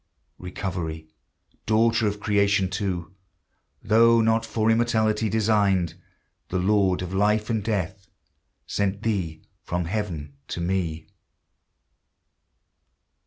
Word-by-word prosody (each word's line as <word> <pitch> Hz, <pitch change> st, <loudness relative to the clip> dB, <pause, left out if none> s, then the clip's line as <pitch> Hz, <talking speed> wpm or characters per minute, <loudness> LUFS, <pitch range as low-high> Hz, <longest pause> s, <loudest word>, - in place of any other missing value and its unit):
Recovery, 90 Hz, -4 st, -5 dB, 0.6 s
daughter 110 Hz, 0 st, +3 dB
of 105 Hz, 0 st, -2 dB
Creation 100 Hz, -2 st, +2 dB
too, 95 Hz, -3 st, -3 dB, 0.7 s
Though 115 Hz, +2 st, +5 dB
not 115 Hz, 0 st, +2 dB
for 110 Hz, 0 st, +1 dB
immortality 110 Hz, -2 st, +1 dB
designed, 100 Hz, -5 st, +2 dB, 0.6 s
The 90 Hz, -, -1 dB
Lord 95 Hz, -1 st, +2 dB
of 90 Hz, +1 st, -6 dB
life 105 Hz, +3 st, +1 dB
and 110 Hz, -2 st, 0 dB
death 95 Hz, -2 st, -3 dB, 0.6 s
Sent 100 Hz, +1 st, -2 dB
thee 95 Hz, -8 st, -2 dB, 0.2 s
from 90 Hz, 0 st, -2 dB
heaven 85 Hz, -7 st, -4 dB
to -, -, -5 dB
me! 85 Hz, -3 st, -2 dB
100 Hz, 100 wpm, -25 LUFS, 90-110 Hz, 0.7 s, Though